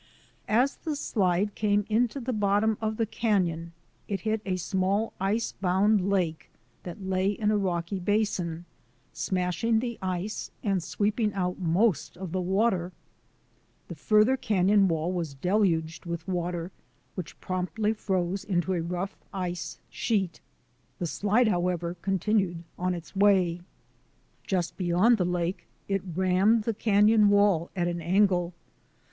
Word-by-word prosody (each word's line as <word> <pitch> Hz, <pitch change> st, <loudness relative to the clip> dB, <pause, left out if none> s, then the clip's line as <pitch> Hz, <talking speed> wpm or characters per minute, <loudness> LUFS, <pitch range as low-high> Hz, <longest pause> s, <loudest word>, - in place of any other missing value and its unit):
As 245 Hz, +6 st, +2 dB
the 310 Hz, -3 st, -3 dB
slide 200 Hz, -6 st, 0 dB
came 205 Hz, -1 st, +1 dB
into 235 Hz, +4 st, +1 dB
the 255 Hz, 0 st, -3 dB
bottom 210 Hz, +1 st, +2 dB
of 220 Hz, 0 st, -1 dB
the 225 Hz, -, +1 dB
canon 180 Hz, -7 st, 0 dB, 0.4 s
it 195 Hz, -3 st, -3 dB
hit 220 Hz, +1 st, -1 dB
a 185 Hz, -, +1 dB
small 190 Hz, +4 st, 0 dB
ice 210 Hz, +4 st, 0 dB
bound 195 Hz, +1 st, +2 dB
lake 175 Hz, -5 st, -1 dB, 0.3 s
that 180 Hz, +3 st, -8 dB
lay 190 Hz, +1 st, +1 dB
in 210 Hz, 0 st, 0 dB
a 210 Hz, -, +2 dB
rocky 180 Hz, 0 st, -2 dB
basin, 180 Hz, -4 st, -1 dB, 0.5 s
smashing 185 Hz, +5 st, 0 dB
the 235 Hz, 0 st, -2 dB
ice 185 Hz, +2 st, -3 dB
and 195 Hz, -4 st, +1 dB
sweeping 210 Hz, +5 st, 0 dB
out 180 Hz, -1 st, -1 dB
most 180 Hz, +2 st, +1 dB
of 185 Hz, -2 st, -6 dB
the 185 Hz, +1 st, -1 dB
water. 190 Hz, -1 st, +1 dB, 1.0 s
The -, -, -5 dB
farther 215 Hz, +4 st, +3 dB
canon 200 Hz, -2 st, +3 dB
wall 165 Hz, 0 st, 0 dB
was 165 Hz, -6 st, -3 dB
deluged 170 Hz, 0 st, 0 dB
with 170 Hz, 0 st, -5 dB
water 175 Hz, -1 st, -2 dB, 0.4 s
which 180 Hz, -4 st, -7 dB
promptly 190 Hz, +4 st, -1 dB
froze 190 Hz, -3 st, -1 dB
in 175 Hz, -3 st, 0 dB
a 185 Hz, -3 st, 0 dB
rough 180 Hz, +4 st, -3 dB, 0.2 s
ice 180 Hz, -3 st, -4 dB
sheet. 195 Hz, -7 st, -1 dB, 0.6 s
The 175 Hz, -, -3 dB
slide, 210 Hz, +8 st, +2 dB
however, 175 Hz, -3 st, 0 dB
continued 195 Hz, -2 st, 0 dB
on 180 Hz, 0 st, -1 dB
its 170 Hz, +3 st, -10 dB
way. 190 Hz, -4 st, +3 dB, 0.9 s
Just 180 Hz, -3 st, -1 dB
beyond 190 Hz, +5 st, +3 dB
the 180 Hz, -, +2 dB
lake 180 Hz, +1 st, -2 dB, 0.2 s
it 195 Hz, -1 st, 0 dB
rammed 190 Hz, +5 st, +3 dB
the 230 Hz, -, -1 dB
canon 210 Hz, 0 st, +4 dB
wall 200 Hz, -5 st, +3 dB
at 175 Hz, -2 st, 0 dB
an 175 Hz, 0 st, -2 dB
angle. 180 Hz, 0 st, +2 dB
190 Hz, 140 wpm, -27 LUFS, 175-210 Hz, 1.0 s, canon